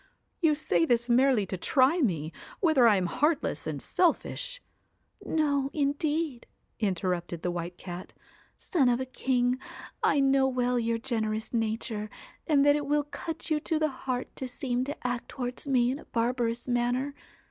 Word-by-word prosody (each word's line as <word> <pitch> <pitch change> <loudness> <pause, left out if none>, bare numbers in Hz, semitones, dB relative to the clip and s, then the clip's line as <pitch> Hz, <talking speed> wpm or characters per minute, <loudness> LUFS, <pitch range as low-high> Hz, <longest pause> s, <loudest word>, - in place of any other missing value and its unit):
You 315 -3 +4
say 175 - +1
this 235 +6 +2
merely 250 -3 +4
to 190 - -4
try 270 - +3
me, 165 - 0 0.3
whether 315 - +5
I 215 - +6
am 185 -2 +1
heartless 295 - 0
and - - -3
selfish 430 +7 0 0.3
' - - -25
'No, 285 -3 +1
indeed,' 295 -1 -1 0.3
interrupted 180 -4 -1
the 180 - 0
White 175 0 -5
Cat; 180 0 -8 0.5
'son 275 -8 +2
of 240 0 +2
a 260 - -2
king, 255 -1 0 0.4
I 285 - +3
know 270 -1 +4
well 250 -1 +1
your 230 0 0
generous 220 -2 -2
nature, 220 -1 -2 0.4
and 285 -3 +4
that 290 0 +6
it 295 -1 -2
will 295 0 +2
cut 320 +3 -6
you 305 - +3
to 320 +1 -1
the 310 0 +1
heart 255 -1 -4
to 260 - -3
seem 250 0 -2
to 285 -2 -7
act 245 -1 -3
towards 250 +2 -4
me 250 -2 +3
in 275 - -4
a - - -13
barbarous 235 0 -1
manner. 245 +3 0
250 Hz, 170 wpm, -28 LUFS, 230-285 Hz, 0.5 s, I